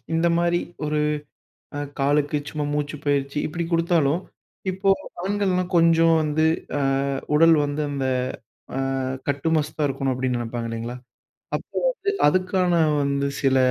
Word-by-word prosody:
இந்த 165 +1 +3
மாரி 175 0 +2 0.3
ஒரு 150 0 0 0.8
அ - - -3 0.2
காலுக்கு 145 +1 +2
சும்மா 150 -1 -3
மூச்சு 150 0 -2
பயிற்சி 140 0 0
இப்பிடி 170 +2 -3
குடுத்தாலும், 165 -2 +2 0.5
இப்போ 190 +1 +1 0.3
ஆண்கள்லாம் 190 -2 0
கொஞ்சம் 165 0 +5
வந்து 155 +1 +1 0.3
அ - - -1 0.5
உடல் 165 +1 +6
வந்து 145 +1 -2
அந்த 140 -2 -2 0.7
அ - - 0 0.5
கட்டுமஸ்தா 150 +2 0
இருக்கணும். 135 0 -1
அப்பிடின்னு 125 -1 -1
நினைப்பாங்க, 115 0 -4
இல்லைங்களா? 115 +2 -4 0.6
அப்போ - - -10
வந்து 415 -5 -2 0.2
அதுக்கான 185 +2 +2 0.3
வந்து 140 0 0
சில 135 -1 +3
150 Hz, 125 wpm, -23 LUFS, 140-170 Hz, 0.8 s, உடல்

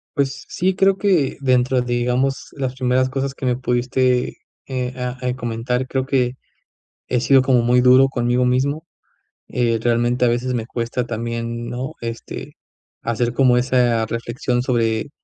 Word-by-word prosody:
Pues 140 -1 -1
sí, 185 +2 0
creo 195 0 +3
que 185 -10 +1
dentro 130 -1 +2
de, 120 0 -2
digamos, 125 +3 0
las 130 -3 -3
primeras 130 0 +1
cosas 135 +1 -3
que 135 - -6
me 125 -1 +2
pudiste, 125 0 0 0.3
eh, 125 -1 -3
ah, 125 0 -3
eh, 125 0 -1
comentar, 125 +1 -2
creo 130 0 -1
que, 125 -2 +1 0.8
he 125 - +2
sido 135 +2 +5
como 130 -2 +3
muy 120 +1 +4
duro 130 +2 +6
conmigo 120 -1 +1
mismo. 140 +6 0 0.6
Eh, 120 -2 +1
realmente 120 +2 +1
a - - +4
veces 120 +2 0
me 115 -2 -2
cuesta 120 0 -3
también, 115 0 -4
¿no? 125 +4 -4
Este, 115 0 -7 0.5
hacer 120 +1 -1
como 125 -1 +4
esa 125 -2 +2
reflexión 120 +2 -2
sobre 115 0 0
125 Hz, 160 wpm, -20 LUFS, 120-130 Hz, 0.8 s, duro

